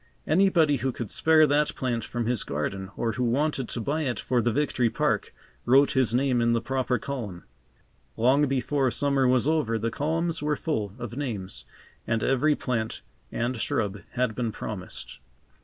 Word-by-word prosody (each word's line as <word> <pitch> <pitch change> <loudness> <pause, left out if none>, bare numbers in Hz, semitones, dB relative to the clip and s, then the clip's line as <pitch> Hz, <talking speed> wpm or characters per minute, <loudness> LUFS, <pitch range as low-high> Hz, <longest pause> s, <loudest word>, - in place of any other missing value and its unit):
Anybody 160 -4 +4
who 130 0 -1
could 120 -3 -6
spare 160 -1 +5
that 150 +1 +1
plant 120 -3 -1
from 120 -1 -3
his 120 -2 0
garden 95 +7 -3
or 115 - 0
who 125 +3 -2
wanted 135 +2 0
to - - -3
buy 145 +7 -1
it 130 -5 -1
for 125 -1 +1
the 120 - +1
Victory 125 -2 +1
Park, - - 0 0.3
wrote 135 +3 +5
his 130 -5 +2
name 125 0 +2
in 115 0 +3
the 115 - +2
proper 130 +1 -1
column. 115 -12 -5 0.7
Long 135 +5 +4
before 135 +1 +1
summer 135 +2 +2
was 125 +1 +3
over 150 -8 +1
the 115 +1 -2
columns 165 +4 -1
were 150 0 +1
full 110 -13 -2
of 120 -2 -6
names 100 - -4 0.4
and 115 -1 0
every 145 +3 +3
plant 115 -5 -3 0.3
and 120 +2 -1
shrub 105 -2 -1
had 125 -2 0
been 115 -1 -2
promised. 100 -4 -7
125 Hz, 175 wpm, -26 LUFS, 115-145 Hz, 0.7 s, spare